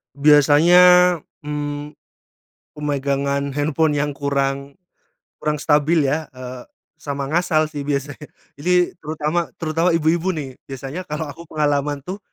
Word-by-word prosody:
Biasanya, 150 +4 +6 0.6
mmm, 145 0 -5 0.8
pemegangan 140 -1 -1
handphone 150 +1 +1
yang 145 0 0
kurang, 140 0 -2 0.6
kurang 150 0 -1
stabil 150 +2 +2
ya, 150 +3 -1
eee, 125 -1 -8 0.4
sama 140 -2 -4
ngasal 160 -2 +2
sih 145 -2 -5
biasanya. 145 +1 -3 0.3
Jadi 180 +3 +2
terutama, 155 +2 -2
terutama 165 +2 +1
ibu-ibu 165 +3 +1
nih, 135 -4 -7
biasanya 135 +7 -7
kalo 150 +1 -4
aku 170 +4 -13
pengalaman 145 -1 0
tuh, 185 +6 -6
150 Hz, 115 wpm, -20 LUFS, 140-160 Hz, 0.8 s, Biasanya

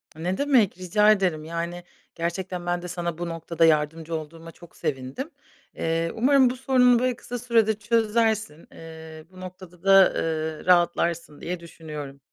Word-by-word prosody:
Ne 175 +4 -3
demek, 260 -11 +2
rica 210 +4 +3
ederim. 180 -7 +1
Yani, 170 +2 -5 0.3
gerçekten 175 +1 -4
ben 175 0 -1
de 180 - -7
sana 170 -2 -4
bu 175 0 -4
noktada 165 0 0
yardımcı 160 +1 +1
olduğuma 165 +1 -8
çok 170 +1 -17
sevindim. 135 - -4 0.5
Eee, 165 0 -1
umarım 260 +2 +4
bu 255 - -4
sorununu, 250 -2 +4
böyle, 255 0 0
kısa 245 +1 -7
sürede 230 -2 +2
çözersin. 220 -6 0
Eee, 160 -1 -11
bu 185 0 -13
noktada 185 -1 -11
da, 195 -1 +7
eee, 160 -1 -3
rahatlarsın 170 -3 +1
diye 175 0 -4
düşünüyorum. 150 -4 -9
175 Hz, 150 wpm, -25 LUFS, 165-215 Hz, 0.5 s, da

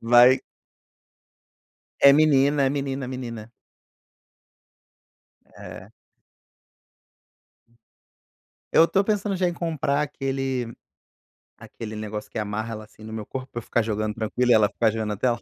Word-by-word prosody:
vai. 120 +2 +6 1.6
É 140 - +8
menina, 145 -1 +4
é 135 - +2
menina, 135 -1 -3
é - - -6
menina. 115 -4 -7 2.1
É. - - -10 2.8
Eu 165 - +7
estou 195 +4 +2
pensando 205 -1 -1
já 180 -1 +1
em 175 - -2
comprar 150 -4 -1
aquele 135 -4 -3 0.9
aquele 110 -1 -8
negócio 105 0 -6
que - - -8
amarra 110 +2 -3
ela, 110 -1 -7
assim, 105 - -18
no 110 - -9
meu 110 -1 -5
corpo, 130 +3 -6
pra - - -10
eu - - -11
ficar 120 - 0
jogando 110 -1 -2
tranquilo 115 +3 0
e - - +8
ela 110 -2 +4
ficar 115 -1 +1
de 115 - -5
olho 110 -1 -2
na 105 -2 -3
tela. 120 0 0
125 Hz, 140 wpm, -24 LUFS, 110-140 Hz, 2.8 s, É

